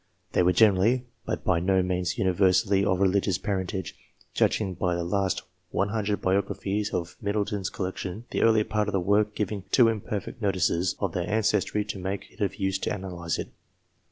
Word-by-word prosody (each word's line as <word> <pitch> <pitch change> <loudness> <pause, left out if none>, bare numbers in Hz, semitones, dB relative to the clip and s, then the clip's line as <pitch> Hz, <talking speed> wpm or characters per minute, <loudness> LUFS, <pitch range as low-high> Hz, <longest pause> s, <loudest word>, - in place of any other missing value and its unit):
They - - +2
were 90 +1 +4
generally, 110 +5 +4 0.2
but - - -2
by 85 - +2
no 95 +1 +2
means 90 0 -1
universally, 95 +1 +3
of 95 -2 +1
religious 95 -2 +2
parentage, 95 -1 -3 0.4
judging 100 -4 +1
by 90 0 0
the 85 - -2
last 95 +2 0 0.3
100 100 +1 0
biographies 100 +2 -1
of 85 -1 -3
Middle 100 0 0
ton's 100 -2 -3
collection, 95 +3 -5
the - - 0
earlier 110 -1 +5
part 105 -1 0
of 105 - -2
the 95 - +2
work 105 +3 +2
giving 105 -1 -2
too 115 +2 +5
imperfect 110 +1 -4
notices 90 -2 +1
of 100 -4 -1
their 90 +2 -2
ancestry 105 -1 +1
to 100 - -5
make 95 +2 -4
it - - -15
of 100 - 0
use 95 0 -1
to - - -2
analyse 90 -4 -4
it. - - -5
100 Hz, 180 wpm, -27 LUFS, 95-105 Hz, 0.4 s, earlier